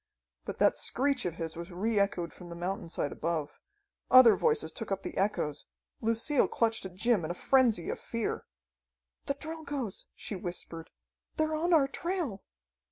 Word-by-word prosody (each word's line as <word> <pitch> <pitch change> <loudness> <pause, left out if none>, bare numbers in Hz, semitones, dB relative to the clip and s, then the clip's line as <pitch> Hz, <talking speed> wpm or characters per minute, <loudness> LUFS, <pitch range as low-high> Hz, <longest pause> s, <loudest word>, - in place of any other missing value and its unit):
But - - -5
that - - +4
screech 275 -1 +1
of 175 -2 -2
his 165 -2 -4
was 170 +2 -7
re 210 +4 +1
echoed 180 -4 0
from 175 -1 -11
the 170 - -7
mountainside 175 -4 -3
above. 160 -3 -3 0.5
Other 255 -4 +9
voices 455 -2 +2
took 225 -3 -5
up 195 0 -1
the - - -5
echoes. 190 -7 -1 0.3
Lucille 230 +5 +2
clutched 225 -4 0
at 180 - -15
Jim 220 -1 +2
in 155 - -3
a 175 - -2
frenzy 240 -7 +3
of - - -5
fear. 230 -1 -3 0.8
"The 280 - 0
Drilgoes!" 290 - -5
she 210 - -5
whispered. 175 -2 -6 0.5
"They're 310 0 +1
on 330 +3 0
our 300 -5 +5
trail!" 330 - -3
215 Hz, 165 wpm, -30 LUFS, 175-275 Hz, 0.8 s, Other